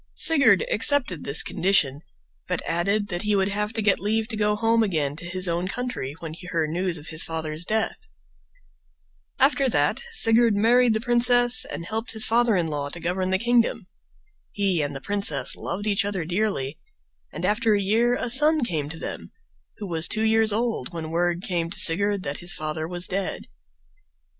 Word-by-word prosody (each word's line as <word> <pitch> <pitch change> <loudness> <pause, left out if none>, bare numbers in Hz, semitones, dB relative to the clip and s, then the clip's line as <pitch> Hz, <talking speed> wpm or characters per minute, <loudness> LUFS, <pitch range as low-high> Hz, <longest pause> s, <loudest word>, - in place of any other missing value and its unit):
Sigurd 275 - +3
accepted 230 - +2
this 140 +3 +5
condition, 160 -7 0 0.5
but 180 -2 -3
added 200 +5 -1
that 175 -2 -3
he 210 0 0
would 195 0 +1
have 210 +1 -2
to 220 -1 -3
get 200 -2 +2
leave 220 +2 -1
to 225 - -3
go 210 0 0
home 225 +1 +1
again 155 -9 -1
to 170 - -8
his 185 +1 0
own 175 +1 -2
country 245 - -5
when 160 -2 -7
he 180 +2 -11
heard 165 -3 -2
news 180 0 -2
of 150 - -9
his 155 0 0
father's 160 0 -4
death. 220 +2 -1 1.4
After 275 0 +2
that - - +1
Sigurd 230 - +4
married 235 +2 +3
the - - 0
princess 245 +1 +4
and 170 - -7
helped 225 +4 -3
his 220 -1 +3
father 235 -1 +2
in 175 -2 0
law 145 -2 -3
to 170 - -7
govern 185 +2 -2
the 190 - +1
kingdom. 230 -1 0 0.7
He 195 -5 0
and 145 -1 -4
the 135 - -7
princess 200 +2 +1
loved 205 +3 -5
each 200 -1 +1
other 200 -5 -3
dearly, 175 -6 -2 0.5
and - - -5
after 215 +1 +2
a - - 0
year 225 +5 +1
a 245 - -3
son 300 +3 +3
came 155 -7 -3
to 165 - -7
them, - - -7 0.5
who 210 - -7
was 165 -2 +1
two 215 - 0
years 220 0 +4
old 225 - -2
when 160 -2 -6
word 175 +1 -1
came 175 -6 -2
to 185 - -6
Sigurd 200 +3 +3
that 140 0 -4
his 175 0 0
father 155 +1 -4
was 175 +1 -1
dead. 195 0 -3
200 Hz, 190 wpm, -23 LUFS, 170-225 Hz, 1.4 s, this